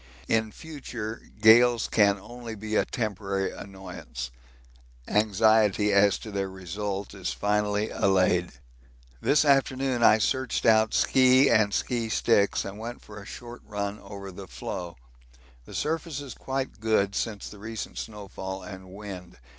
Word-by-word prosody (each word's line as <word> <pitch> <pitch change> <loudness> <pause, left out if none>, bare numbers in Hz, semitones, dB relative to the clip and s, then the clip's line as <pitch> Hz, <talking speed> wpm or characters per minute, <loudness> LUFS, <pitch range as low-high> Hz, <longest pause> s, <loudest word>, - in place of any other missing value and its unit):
In 110 -1 +1
future 120 -7 -7
gales 115 +2 +6
can 100 -2 +4
only 115 +2 -8
be 110 +1 -4
a - - +3
temporary 100 -4 -2
annoyance 90 -11 -8 0.8
anxiety 105 0 +3
as 100 0 +5
to 110 - -9
their 100 -1 -2
result 95 +2 -5
is 95 -3 -3
finally 105 +1 0
allayed. 90 -2 +2 0.7
This 150 +1 +3
afternoon 135 -2 +2
I 110 - +7
searched 130 +3 0
out 110 -1 +4
ski 130 +1 +5
and 105 -2 +4
ski 115 +1 -1
sticks 105 -2 +2
and 100 +2 -7
went 120 +2 -7
for 105 -1 -10
a 100 - -12
short 120 0 -9
run 100 0 -4
over 100 -1 -9
the 95 +1 -9
floe. 85 -1 -6 0.7
The - - -10
surface 160 -1 -2
is 140 -3 -7
quite 135 -4 -4
good 105 -3 +2
since 105 0 -3
the 105 - -11
recent 110 +1 -6
snowfall 95 -3 -6
and 95 0 -9
wind. 95 -4 -9
105 Hz, 140 wpm, -27 LUFS, 100-115 Hz, 0.8 s, I